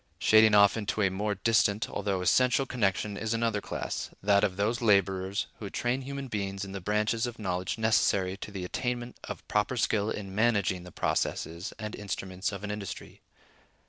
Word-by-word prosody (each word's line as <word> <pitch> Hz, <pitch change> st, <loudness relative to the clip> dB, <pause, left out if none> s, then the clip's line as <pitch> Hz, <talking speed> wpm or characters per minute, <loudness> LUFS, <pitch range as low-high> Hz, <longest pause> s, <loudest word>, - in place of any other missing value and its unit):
Shading 110 Hz, -1 st, +6 dB
off 100 Hz, +1 st, +6 dB
into 105 Hz, 0 st, -1 dB
a 95 Hz, -, +2 dB
more 105 Hz, +2 st, -1 dB
distant, 110 Hz, 0 st, +2 dB
although 100 Hz, -2 st, -2 dB
essential, 125 Hz, +7 st, +3 dB
connection 100 Hz, -4 st, -1 dB
is 110 Hz, +2 st, -1 dB
another 115 Hz, -3 st, 0 dB
class—that 100 Hz, 0 st, -1 dB
of 95 Hz, -2 st, 0 dB
those 110 Hz, +4 st, 0 dB
laborers 100 Hz, -2 st, +2 dB
who 105 Hz, -, -5 dB
train 120 Hz, +5 st, -1 dB
human 140 Hz, +1 st, -5 dB
beings 100 Hz, -3 st, -3 dB
in 95 Hz, -, -8 dB
the 100 Hz, 0 st, -5 dB
branches 105 Hz, +4 st, 0 dB
of 120 Hz, -1 st, -7 dB
knowledge 90 Hz, -2 st, -2 dB
necessary 105 Hz, -4 st, +2 dB
to 105 Hz, -, -7 dB
the 95 Hz, -3 st, -5 dB
attainment 120 Hz, +4 st, -3 dB
of -, -, -8 dB
proper 105 Hz, +4 st, 0 dB
skill 105 Hz, -1 st, +1 dB
in 100 Hz, -3 st, -5 dB
managing 100 Hz, -5 st, +1 dB
the 90 Hz, -, -10 dB
processes 85 Hz, +1 st, -2 dB
and 105 Hz, -1 st, -5 dB
instruments 95 Hz, -1 st, -4 dB
of 100 Hz, 0 st, -7 dB
an 105 Hz, -, -3 dB
industry. 105 Hz, -2 st, -7 dB
105 Hz, 175 wpm, -29 LUFS, 95-110 Hz, -, Shading